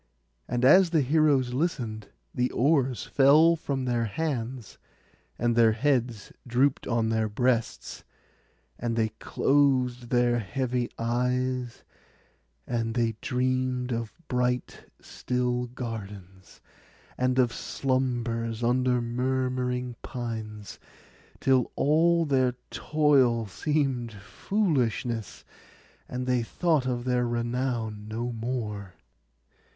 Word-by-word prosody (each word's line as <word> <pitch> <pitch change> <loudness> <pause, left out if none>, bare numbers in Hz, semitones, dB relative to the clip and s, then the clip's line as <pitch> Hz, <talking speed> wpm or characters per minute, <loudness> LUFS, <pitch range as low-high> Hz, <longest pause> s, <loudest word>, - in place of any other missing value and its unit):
And 120 +1 0
as 185 +6 +7
the 165 -3 +2
heroes 140 -3 +2
listened, 120 - -2 0.3
the 125 +1 0
oars 135 -2 +1
fell 150 +5 +5
from 140 -5 -3
their 120 -2 0
hands, 125 -2 -4 0.6
and 120 0 +1
their 115 -2 +5
heads 120 -4 -1
drooped 130 +3 +1
on 115 -2 +1
their 110 -1 0
breasts, 120 +2 -1 0.8
and 115 -1 -2
they 110 -1 +1
closed 130 -4 +1
their 120 -1 +2
heavy 125 +3 -2
eyes; 125 +1 -1 0.8
and 115 -2 -2
they 115 -2 +1
dreamed 130 0 -1
of 115 -2 -3 0.2
bright 125 -1 -1
still 125 0 -2
gardens, 100 -6 -8 0.5
and 130 0 0
of 125 -3 +3
slumbers 120 -3 -2
under 125 0 +2
murmuring 125 0 -1
pines, 110 -4 -6 0.6
till 130 -3 +2
all 165 +3 +3
their 130 -3 +2 0.2
toil 135 -7 +2
seemed 130 - -1
foolishness, 120 - -2 0.6
and 125 0 -4
they 125 -1 +1
thought 150 +3 0
of 120 -1 -2
their 125 -1 +1
renown 120 -3 -2
no 115 +3 -3
more. 110 -5 -4
125 Hz, 105 wpm, -27 LUFS, 115-130 Hz, 0.8 s, as